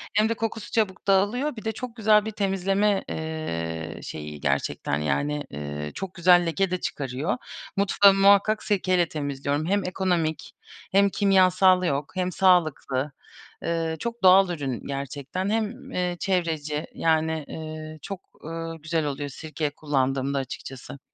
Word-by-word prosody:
hem 215 +1 +4
de - - +2
kokusu 225 -1 -4
çabuk 205 -4 -1
dağılıyor. 210 +9 +2
Bir 220 - -9
de 220 - +1
çok 245 +1 -7
güzel 215 -2 +4
bir 220 - -3
temizleme, 195 0 +1
eee, 85 - -4
şeyi 75 -1 -7
gerçekten, 70 +1 -1
yani, 145 - -1
ııı, 75 +1 -5
çok 190 -2 -6
güzel 175 0 +5
leke 180 +3 0
de 185 - 0
çıkarıyor. 140 - -2 0.4
Mutfağımı 195 0 +5
muhakkak 200 +2 +5
sirke 185 -2 +1
ile 175 -1 +3
temizliyorum. 145 0 -2
Hem 200 +3 +1
ekonomik 175 -4 -1 0.4
hem 200 +1 +5
kimyasal 185 -2 +4
yok 145 -1 -1
hem 185 0 0
sağlıklı. 155 -7 +2 0.5
Iıı, 165 -1 -1
çok 235 -1 -5
doğal 185 0 +7
ürün 140 -8 -4
gerçekten. 140 +7 -4
Hem, 225 +3 -2
eee, 180 -1 -1
çevreci, 160 -6 -1
yani, 160 -1 +1
eee, 155 0 -7
çok, 195 +3 -6 0.2
ııı, 165 0 -5
güzel 155 0 -1
oluyor 145 0 -3
sirke 155 +1 -4
kullandığımda 140 -2 -1
açıkçası. 135 +1 -7
165 Hz, 140 wpm, -25 LUFS, 145-195 Hz, 0.5 s, doğal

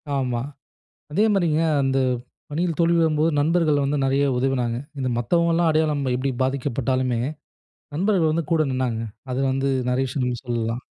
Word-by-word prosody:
ஆமா, 125 -3 -1 0.7
அதே 205 +8 +3
மாரிங்க 165 -5 +2 0.2
அந்த 135 0 +1 0.5
பணியில் 165 +1 -1
தோல்வி 170 0 +3
வரும்போது 160 0 +2
நண்பர்கள் 155 -2 +2
வந்து 145 +1 0
நிறைய 135 +1 +2
உதவினாங்க. 125 -3 0 0.2
இந்த 130 -1 -1
மத்தவங்கலாம் 170 +6 +2
அடையாளம் 155 -2 +1
எப்டி 130 +2 -1
பாதிக்கப்பட்டாலுமே, 130 -2 -1 0.8
நண்பர்கள் 180 -3 +2
வந்து 165 -1 -1
கூட 165 -1 +3
நின்னாங்க. 125 -3 -1 0.3
அது 125 - -1
வந்து 135 +1 0 0.2
நிறையா 130 +1 +1
விஷயங்கள் 125 -2 -2
சொல்லலாம். 120 0 -2
140 Hz, 135 wpm, -23 LUFS, 130-160 Hz, 0.8 s, அதே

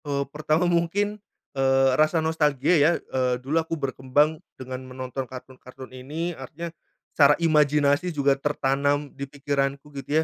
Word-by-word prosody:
Eee, 140 -1 -1
pertama 155 +3 +1
mungkin, 190 +5 0 0.3
eee, 135 -1 +3
rasa 155 +3 +2
nostalgia 150 -1 +1
ya, 150 +4 +5
eee, 125 -1 -1
dulu 135 +6 -2
aku 165 +1 -4
berkembang 145 +3 0 0.2
dengan 130 0 -7
menonton 130 0 -6
kartun-kartun 130 0 -11
ini 155 +7 -4
artinya, 160 +4 -8 0.4
secara 145 0 +6
imajinasi 150 +1 +3
juga 140 -4 +2
tertanam 145 0 0
di 140 0 -6
pikiranku 140 0 -2
gitu 145 +3 0
145 Hz, 135 wpm, -25 LUFS, 135-155 Hz, 0.4 s, secara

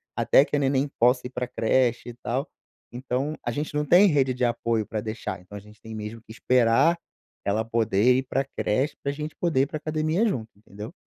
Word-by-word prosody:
até 140 - +4
que - - -2
a 145 - +2
neném 135 +1 +1
possa 125 +2 +3
ir 125 - -6
pra 125 -1 -3
creche 120 0 +1
e - - -7
tal. 125 +4 -3 0.4
Então 130 +4 -2
a 120 - -2
gente 150 +5 -3
não 150 - 0
tem 175 +7 +6
rede 135 -6 +2
de 125 - +1
apoio 115 -2 0
pra 110 0 -4
deixar, 110 -3 -5
então 95 +3 -11
a - - -7
gente 105 +2 -18
tem 110 0 -9
mesmo 110 +1 -7
que 110 - -15
esperar 125 +7 +3 0.5
ela 110 +3 0
poder 115 +1 +2
ir 130 - 0
pra 135 0 0
creche 135 +7 0
pra 140 - 0
gente 150 +2 -6
poder 165 -7 +1
ir 135 - +3
pra 155 - -5
academia 155 +6 0
junto, 115 - -2
entendeu? 105 - -10
125 Hz, 215 wpm, -25 LUFS, 110-145 Hz, 0.5 s, tem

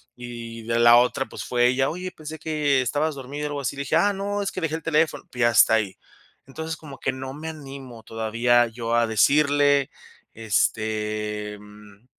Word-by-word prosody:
Y 115 -2 -8
de 115 +1 0
la 120 0 +8
otra, 125 +2 +2
pues, - - -7
fue 120 0 +2
ella: 130 +2 +2
"Oye, 180 +3 -5
pensé 155 -2 -9
que 150 -3 +1
estabas 145 +4 -1
dormido, 140 +3 -5
algo 145 -1 -4
así", 135 +1 -3
le 140 - -4
dije: 155 - +1
"Ah, 205 +5 +3
no, 200 +1 -2
es 200 - -2
que 185 - -5
dejé 160 -1 -1
el 160 - -5
teléfono", 160 0 +1
y 125 -1 -1
hasta 115 -1 +5
ahí. 105 -4 -1 0.5
Entonces, 160 +4 -5
como 145 -4 -11
que 130 - -1
no 130 0 -6
me 155 +3 -8
animo 135 -6 -10
todavía 115 +2 +2
yo 115 0 -3
a 120 0 +3
decirle, 140 +5 +3 0.4
este, 105 -1 -1
mm, 105 +1 -16
130 Hz, 185 wpm, -24 LUFS, 115-150 Hz, 0.5 s, la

